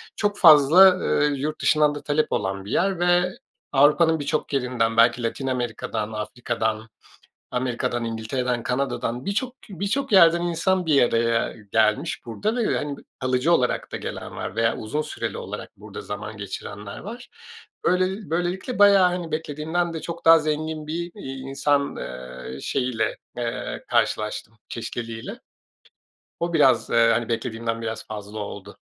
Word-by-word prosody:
çok 205 -1 0
fazla, 175 +4 +8
eee, 145 - +2
yurt 150 +3 -3
dışından 150 -1 +3
da 145 - -6
talep 150 +1 0
olan 95 0 -2
bir 105 - -7
yer 190 -1 +1
ve 175 +1 +2 0.3
Avrupa'nın 155 +4 +4
birçok 150 +1 -2
yerinden 125 -4 0
belki 115 +1 +4
Latin 135 +4 -3
Amerika'dan, 115 -3 -3
Afrika'dan, 110 0 -3 0.6
Amerika'dan, 125 -1 -1
İngiltere'den, 115 +2 -2
Kanada'dan 125 -1 -2
birçok 240 +6 -2
birçok 200 - -2
yerden 170 -3 +6
insan 175 +1 0
bir 150 -3 +4
araya 115 0 +1 0.2
gelmiş 110 -1 +1
burada 205 - -2
ve, 235 -3 +1
hani, 145 -1 -4
b - - -13 0.2
kalıcı 130 +5 +2
olarak 125 -6 0
da - - -3
gelen - - -6
var - - -5
veya 115 0 +1
uzun 145 +8 -2
süreli - - -4
olarak - - -7
burada - - -9
zaman 105 +1 -6
geçirenler 100 0 -7
var. 235 +5 -9 0.6
Böyle 185 +2 0
böylelikle 180 +8 -2
bayağı, 200 -2 +7
hani, 175 -2 -4
beklediğimden 160 +3 -2
de 160 - -5
çok 170 0 -7
daha 165 0 +8
zengin 155 0 -3
bir, 170 +2 -4
iii, 135 -10 -7
insan, 140 +1 0
eee, 65 +1 -7
şeyiyle, 125 -4 -1 0.2
eee, 120 -1 -4
karşılaştım 110 +1 -1
çeşitliliğiyle. 115 -1 -6 1.0
O 170 0 -2
biraz, 145 -5 +4
eee, 115 0 +4
hani, 120 -1 -1
beklediğimden 115 -1 -2
biraz 110 0 -5
fazla 105 0 -7
oldu. 100 - -8
135 Hz, 145 wpm, -24 LUFS, 115-170 Hz, 1.0 s, fazla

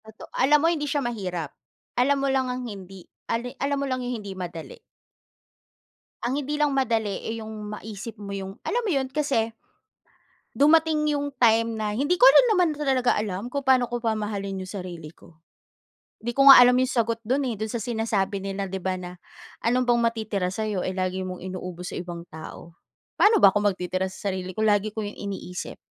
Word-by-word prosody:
Toto 220 0 -12
alam 285 +3 +4
mo, - - +6
hindi 295 -3 -3
siya 290 0 0
mahirap. 180 -9 -4 0.5
Alam 280 +3 +3
mo - - +2
lang 260 -1 +1
ang 250 0 -4
hindi 195 -4 -9 0.2
ale 245 +2 -2
alam 280 0 0
mo 280 - -1
lang 255 -1 -2
'yong 245 -1 -3
hindi 200 -2 -7
madali. 170 -3 -7 1.5
Ang 255 +3 -1
hindi 290 0 -3
lang 295 0 +2
madali, 230 -7 0
eh, 225 0 -4
'yong 215 -1 -7
maisip 220 +1 -7
mo 200 - -7
'yong, 195 0 -6
alam 485 - -1
mo - - 0
'yon, 265 -2 0
kasi, 275 -6 0 1.0
dumating 305 +1 +4
'yong 285 -1 -1
time 230 -1 +4
na, 215 -1 -2
hindi 290 +7 +2
ko 360 - +5
rin - - +7
naman 350 -6 +2
talaga 265 -4 +1
alam 210 +2 -3
kung 280 +1 -4
pa'no 255 -2 +4
ko 240 - -2
mamahalin 205 -3 -2
'yong 185 - -8
sarili 180 -5 -7
ko. 170 - -19 0.9
'Di 235 - -3
ko 275 - +5
nga 270 - +12
alam 250 0 +6
'yong 255 +1 +1
sagot 230 -2 +1
do'n, 260 +5 +1
eh, - - -6
do'n 215 +1 -4
sa 235 - -2
sinasabi 220 -3 -1
nila, 195 0 -3
'di 190 - -3
ba, 185 -1 -1
na, 180 0 -8 0.5
"Ano 245 +2 +3
bang 240 -1 +3
matitira 220 -5 -1
sa'yo, 210 -3 -2
eh, 185 - -2
lagi 185 0 -2
mong 185 -1 -6
inuubos 180 -1 -6
sa - - -4
ibang 175 -1 -6
tao." 160 +1 -11 0.4
Paano 435 +2 +6
ba - - +9
ko 205 - +1
magtitira 185 -2 0
sa 195 - -6
sarili 185 0 -5
ko, 215 - -4
lagi 210 0 +2
ko 220 - -3
'yong 205 - -7
iniisip. 195 -3 -6
220 Hz, 195 wpm, -25 LUFS, 190-260 Hz, 1.5 s, nga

